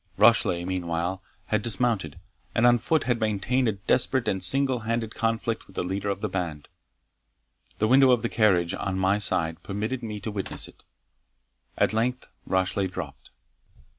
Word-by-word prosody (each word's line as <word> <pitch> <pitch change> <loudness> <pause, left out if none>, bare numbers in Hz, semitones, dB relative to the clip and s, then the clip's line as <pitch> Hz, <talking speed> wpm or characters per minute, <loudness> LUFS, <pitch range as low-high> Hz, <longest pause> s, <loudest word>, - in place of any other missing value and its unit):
Rashleigh, 105 -5 +4
meanwhile, 90 0 -2 0.2
had 110 -1 0
dismounted, 110 - +2 0.4
and 115 - +3
on 120 0 +5
foot 155 +6 +1
had 120 -1 0
maintained 110 +4 0
a 110 - +1
desperate 120 +6 +1
and 95 -1 0
single 130 +4 +4
handed 115 0 -2
conflict 115 0 -2
with 95 - -18
the - - -1
leader 95 +3 -3
of 100 0 -3
the 105 - -1
band. 85 -7 -4 1.1
The 110 - +1
window 130 +2 +6
of 125 -2 +3
the - - +1
carriage, 95 -7 +2
on 95 -1 -3
my 95 +2 +2
side, 80 -4 -1
permitted 110 +7 -3
me 105 -3 -5
to 110 - -4
witness 100 -2 -3
it. - - -18 0.9
At - - +2
length 125 +3 -1 0.2
Rashleigh 95 +1 0
dropped. 90 - -8
105 Hz, 165 wpm, -26 LUFS, 95-115 Hz, 1.1 s, window